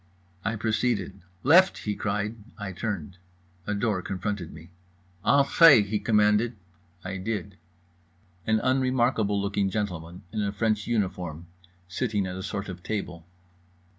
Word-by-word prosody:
I 115 - -1
proceeded. 110 -3 -1 0.2
"Left!" 180 +7 +6
he 105 - -3
cried. 105 +2 -2 0.2
I 100 -3 -5
turned. 95 -3 -4 0.5
A 105 - 0
door 100 -2 0
confronted 95 -1 -4
me. 80 +3 -13 0.5
"Entrez," 140 - +6
he 105 0 0
commanded. 105 +2 +3 0.5
I 95 +1 -4
did. 100 0 -4 0.9
An 110 0 +3
unremarkable 130 -5 +2
looking 100 0 0
gentleman 90 -4 -4
in 110 -1 -2
a 100 -1 0
French 105 0 0
uniform, 90 -7 -2 0.4
sitting 105 +1 -1
at 90 0 -5
a 95 - -5
sort 100 +2 -4
of 90 -2 -7
table. 90 -5 -5
105 Hz, 130 wpm, -27 LUFS, 95-110 Hz, 0.9 s, Left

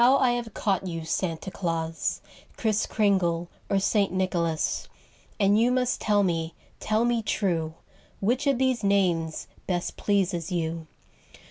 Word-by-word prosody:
I 260 0 +5
have 240 -3 -3
caught 195 -2 0
you 165 -2 -4
Santa 165 +2 -2
Claus, 165 -3 -2 0.4
Kriss 220 -2 +1
Kringle 175 -5 +1 0.2
or 200 - +2
St. 200 +1 +2
Nicholas, 175 -4 0 0.5
And 205 +1 +4
you 240 +2 +4
must 250 -1 +1
tell 205 -1 +3
me, 165 -3 -1 0.2
tell 215 +2 +1
me 240 -1 +2
true. 170 -7 -1 0.4
Which 245 +8 +1
of 275 -2 +3
these 255 -3 +1
names 175 -5 +1 0.2
best 175 -2 -2
pleases 190 -4 0
you'? 165 -2 -2
195 Hz, 135 wpm, -26 LUFS, 170-220 Hz, 0.5 s, I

